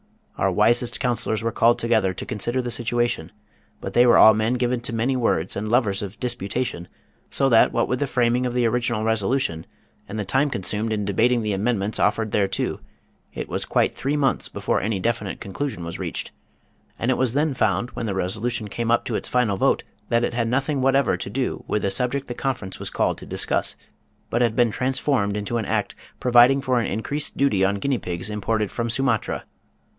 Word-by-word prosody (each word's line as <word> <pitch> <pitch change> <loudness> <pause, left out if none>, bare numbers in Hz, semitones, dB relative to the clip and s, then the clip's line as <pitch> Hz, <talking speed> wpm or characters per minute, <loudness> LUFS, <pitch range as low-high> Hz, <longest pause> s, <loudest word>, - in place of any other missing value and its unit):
Our 95 - +1
wisest 115 +5 +3
counsellors 120 -4 0
were 115 - 0
called 120 +1 +3
together 110 -6 +1
to - - -6
consider 120 +2 -1
the 120 - -3
situation, 120 0 0 0.5
but - - -6
they 120 +1 +5
were 120 - +6
all 110 - +9
men 110 +3 0
given 125 0 0
to 115 -1 -2
many 120 +4 +1
words 105 -8 0
and 105 +2 -3
lovers 110 -5 +2
of 100 +2 -7
disputation, 120 -5 -3 0.4
so 135 - +1
that 115 -3 +5
what 115 - +1
with 125 - -1
the 145 - 0
framing 125 0 +1
of 125 - -4
the 125 -1 +2
original 120 -1 0
resolution, 110 -5 0 0.4
and 105 - -5
the 105 - -2
time 135 +8 +1
consumed 105 0 -2
in 105 -2 -1
debating 115 +5 +2
the 105 -1 -1
amendments 105 0 -1
offered 110 +1 +1
thereto, 100 -2 0 0.6
it - - -4
was - - -2
quite - - +1
three 140 +3 -1
months 140 -2 +1
before - - -1
any 105 -1 -1
definite 110 -1 -2
conclusion 100 -1 -4
was 85 - -6
reached, - - -4 0.7
and 120 - 0
it - - +1
was 130 -3 +1
then 150 +1 +1
found 110 -1 0
when 115 - -4
the 100 - -2
resolution 105 +5 -2
came 115 +3 -3
up 120 - +2
to - - -3
its - - -2
final 120 -6 +1
vote - - +2 0.3
that 120 0 +2
it 120 - -1
had 115 -1 0
nothing 135 +3 0
whatever 135 +1 +3
to - - -5
do 125 +4 -2
with 105 - -1
the 100 - +1
subject 125 +7 0
the 120 - -4
conference 120 -8 -3
was - - -2
called - - 0
to - - -11
discuss, - - 0 0.6
but 120 - +1
had 115 -2 +2
been 120 -2 +3
transformed 125 -4 0
into 105 +3 -2
an 110 - -2
Act - - -1 0.3
providing 125 +2 +5
for 130 -2 +1
an 115 - -1
increased 140 +7 -3
duty 120 -9 +2
on 100 +1 +2
guinea 130 +5 -1
pigs 90 +4 -5
imported 105 0 -1
from 115 -1 -2
Sumatra. 125 -2 0
115 Hz, 205 wpm, -23 LUFS, 105-125 Hz, 0.7 s, all